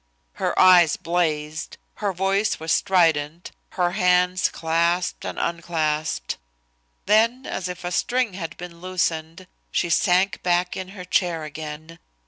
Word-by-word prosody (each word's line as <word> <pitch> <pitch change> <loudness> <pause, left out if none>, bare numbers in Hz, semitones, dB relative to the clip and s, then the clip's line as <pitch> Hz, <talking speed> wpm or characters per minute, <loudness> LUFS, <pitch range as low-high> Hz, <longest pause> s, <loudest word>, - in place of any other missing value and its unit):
Her - - 0
eyes 180 -4 +6
blazed, 160 -3 -2 0.2
her 205 -2 -1
voice 195 +3 0
was 160 0 -3
strident, 165 -3 +2 0.3
her 175 -1 +2
hands 180 +1 +2
clasped 170 +2 0
and - - -5
unclasped. 160 -2 -2 0.7
Then, 230 +5 +3
as 185 - -4
if 180 0 -7
a 175 - -3
string 245 +3 0
had 170 -2 -6
been 170 -1 -10
loosened, 175 -1 -2 0.2
she 170 - -1
sank 185 +1 +2
back 180 0 +1
in 185 - -5
her 180 - -7
chair 175 -3 0
again. 155 +2 -8
175 Hz, 130 wpm, -23 LUFS, 160-185 Hz, 0.7 s, eyes